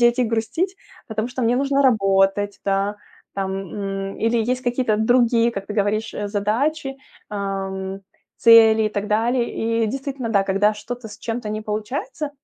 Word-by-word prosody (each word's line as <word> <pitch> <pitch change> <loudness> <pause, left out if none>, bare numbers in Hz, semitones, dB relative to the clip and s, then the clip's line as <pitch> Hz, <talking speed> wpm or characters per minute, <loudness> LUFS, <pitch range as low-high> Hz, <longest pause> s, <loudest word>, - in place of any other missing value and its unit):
сидеть 240 +1 +4
и 250 - +3
грустить, 235 - -1 0.3
потому 220 0 -3
что 255 0 -4
мне 235 +2 +2
нужно 275 +1 +1
работать, 195 -3 +2
да, 200 +1 0 0.4
там, 195 -1 -2
м, 195 0 -4
или 230 +1 +1
есть 255 0 -1
какие-то 245 -3 +1
другие, 235 0 +3
как 195 -3 -5
ты 210 - -5
говоришь, 215 +1 0
э, 205 - -3
задачи, 270 +8 -1 0.3
э, - - -6
м, 195 -1 -4 0.3
цели 225 -1 +7
и - - +2
так 205 0 -3
далее. 230 0 +1
И - - 0
действительно, 270 0 -4
да, 200 -3 +3
когда 200 +2 +2
что-то 235 +2 -7
с 210 - -10
чем-то 225 -1 -4
не 215 0 -3
получается, 230 +8 -4
220 Hz, 170 wpm, -22 LUFS, 205-245 Hz, 0.4 s, цели